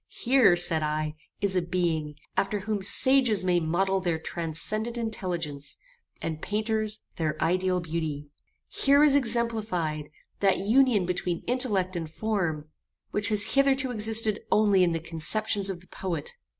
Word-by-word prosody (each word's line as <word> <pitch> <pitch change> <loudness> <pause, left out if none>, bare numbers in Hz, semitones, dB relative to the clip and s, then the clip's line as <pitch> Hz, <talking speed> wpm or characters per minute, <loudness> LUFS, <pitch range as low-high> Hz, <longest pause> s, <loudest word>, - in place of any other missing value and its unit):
"Here, 245 -7 +4
said 175 -2 +5
I, 155 0 -2 0.3
is 200 -2 -1
a 180 - +2
being, 170 -4 -2 0.2
after 205 0 -1
whom 210 0 -3
sages 235 0 +6
may 180 -1 +2
model 190 +4 0
their 175 -3 -1
transcendent 175 +9 -3
intelligence, 175 -10 -4 0.5
and 160 -1 -4
painters, 215 0 -2 0.2
their 155 -2 -2
ideal 185 +1 0
beauty. 155 -4 -5 0.4
Here 280 +1 +3
is 290 -2 +4
exemplified, 220 - 0 0.3
that 195 -1 +2
union 220 0 +2
between 180 -1 -3
intellect 210 -8 -1
and 165 -2 -4
form, 170 -6 -3 0.4
which 210 +1 0
has 210 -1 +1
hitherto 275 -1 +2
existed 220 -1 +3
only 205 -3 +3
in 175 - +2
the 165 - -2
conceptions 195 +6 -2
of 180 -3 -6
the 185 - -19
poet. 170 -6 -5
190 Hz, 140 wpm, -26 LUFS, 165-220 Hz, 0.5 s, sages